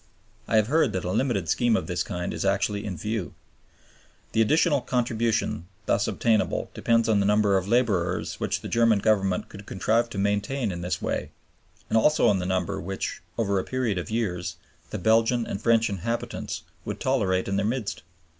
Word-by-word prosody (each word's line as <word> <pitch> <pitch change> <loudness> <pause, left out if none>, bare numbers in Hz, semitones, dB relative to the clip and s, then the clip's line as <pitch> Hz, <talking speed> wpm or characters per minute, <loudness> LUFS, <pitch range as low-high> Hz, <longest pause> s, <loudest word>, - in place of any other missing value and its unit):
I - - 0
have 110 -1 +5
heard 145 -1 +2
that 95 - -2
a 90 - -2
limited 110 -7 0
scheme 115 +7 +2
of - - -3
this 90 +1 -2
kind 90 +1 -3
is - - -3
actually 100 +2 0
in 95 -5 -4
view. 105 0 -3 1.0
The 115 - +2
additional 150 - +3
contribution 115 -7 -1 0.2
thus 105 -1 +1
obtainable 110 -2 +1
depends 115 -1 +2
on 110 -2 +3
the 100 - +2
number 105 -1 +3
of 95 0 0
laborers 100 -7 +1
which - - -1
the - - -6
German 115 -2 +3
Government 100 -3 +1
could 100 0 -12
contrive 115 +5 +1
to 105 - -7
maintain 105 +4 0
in 85 -1 -5
this 90 +1 -3
way - - -2 0.6
and 110 - +3
also 150 +2 +4
on 100 -2 +2
the 90 - -3
number 95 -2 -1
which, 95 +3 -4 0.2
over 100 -4 +1
a - - -2
period 125 -7 -1
of 85 - -6
years, 90 -6 -2 0.3
the - - -4
Belgian 115 +4 +3
and 100 - -5
French 115 -1 +3
inhabitants 105 +4 -3 0.2
would - - -5
tolerate 100 -9 +1
in 100 0 0
their 100 - +1
midst. 115 -3 -2
105 Hz, 185 wpm, -26 LUFS, 95-115 Hz, 1.0 s, have